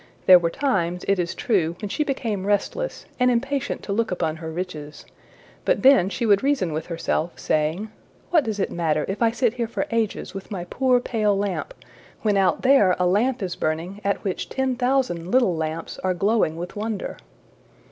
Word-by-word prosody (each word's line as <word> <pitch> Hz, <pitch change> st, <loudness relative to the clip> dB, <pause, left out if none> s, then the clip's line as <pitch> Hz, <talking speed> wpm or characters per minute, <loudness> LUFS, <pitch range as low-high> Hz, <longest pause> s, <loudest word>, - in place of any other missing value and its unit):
There 185 Hz, -1 st, +9 dB
were 170 Hz, -1 st, 0 dB
times, 180 Hz, -7 st, -1 dB
it 195 Hz, -1 st, +2 dB
is 175 Hz, +1 st, -2 dB
true, 175 Hz, -8 st, +1 dB
when 210 Hz, -, -4 dB
she 300 Hz, -, 0 dB
became 225 Hz, -9 st, -2 dB
restless, 210 Hz, -, -1 dB
and 250 Hz, 0 st, +4 dB
impatient 265 Hz, +3 st, -1 dB
to 200 Hz, -, -3 dB
look 230 Hz, +2 st, 0 dB
upon 165 Hz, -3 st, -1 dB
her 160 Hz, 0 st, -6 dB
riches, 160 Hz, -4 st, -6 dB, 0.6 s
but -, -, +1 dB
then 260 Hz, -9 st, +6 dB
she 235 Hz, +4 st, -2 dB
would 205 Hz, -3 st, +4 dB
reason 265 Hz, -, +1 dB
with 155 Hz, -, -4 dB
herself, 170 Hz, 0 st, -2 dB
saying, 160 Hz, +8 st, -1 dB, 0.4 s
``What 315 Hz, -6 st, +4 dB
does 215 Hz, -2 st, -3 dB
it 195 Hz, -, -1 dB
matter 155 Hz, -3 st, 0 dB
if 195 Hz, +4 st, -4 dB
I 230 Hz, -, +5 dB
sit 235 Hz, 0 st, +1 dB
here 240 Hz, -2 st, -2 dB
for 235 Hz, -, -2 dB
ages 225 Hz, -3 st, -1 dB
with 195 Hz, 0 st, -8 dB
my 190 Hz, -4 st, -4 dB
poor 255 Hz, +6 st, +2 dB
pale 215 Hz, -4 st, 0 dB
lamp, 205 Hz, -, -3 dB, 0.5 s
when 210 Hz, -2 st, +2 dB
out 190 Hz, -4 st, +2 dB
there 255 Hz, -9 st, +5 dB
a 180 Hz, -, +1 dB
lamp 225 Hz, +6 st, +1 dB
is 180 Hz, -2 st, -3 dB
burning 170 Hz, +6 st, -3 dB
at 200 Hz, 0 st, -1 dB
which 190 Hz, -3 st, -3 dB
ten 265 Hz, -1 st, -1 dB
thousand 245 Hz, -9 st, 0 dB
little 235 Hz, -6 st, +3 dB
lamps 160 Hz, +1 st, -4 dB
are 185 Hz, -1 st, 0 dB
glowing 200 Hz, -3 st, +1 dB
with 175 Hz, +1 st, -6 dB
wonder?'' 215 Hz, 0 st, -4 dB
200 Hz, 190 wpm, -23 LUFS, 175-240 Hz, 0.6 s, There